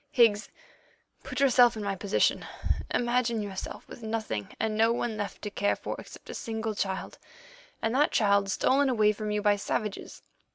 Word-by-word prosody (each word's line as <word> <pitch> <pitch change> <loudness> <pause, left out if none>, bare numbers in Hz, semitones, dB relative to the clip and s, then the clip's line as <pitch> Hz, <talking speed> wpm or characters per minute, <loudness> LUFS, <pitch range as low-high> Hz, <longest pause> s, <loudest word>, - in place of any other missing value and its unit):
Higgs, 225 -6 +3 0.7
put - - -5
yourself 250 -4 +5
in 215 - -4
my 200 -1 -1
position. 200 +2 +1 0.5
Imagine 240 -1 +1
yourself 200 -2 -6
with - - -11
nothing 220 - -3
and 220 -1 0
no 225 +1 +4
one 235 -1 -1
left 205 -1 -5
to 210 - -4
care 205 0 +1
for - - -5
except - - -11
a - - -7
single 220 -2 -3
child, 195 -2 -3 0.6
and 225 - +1
that 290 +4 +4
child 200 -2 +3
stolen 270 +7 +3
away 215 -4 +4
from 215 0 -4
you 210 0 -1
by 205 -1 +4
savages. 205 0 -4
215 Hz, 170 wpm, -28 LUFS, 205-235 Hz, 0.7 s, yourself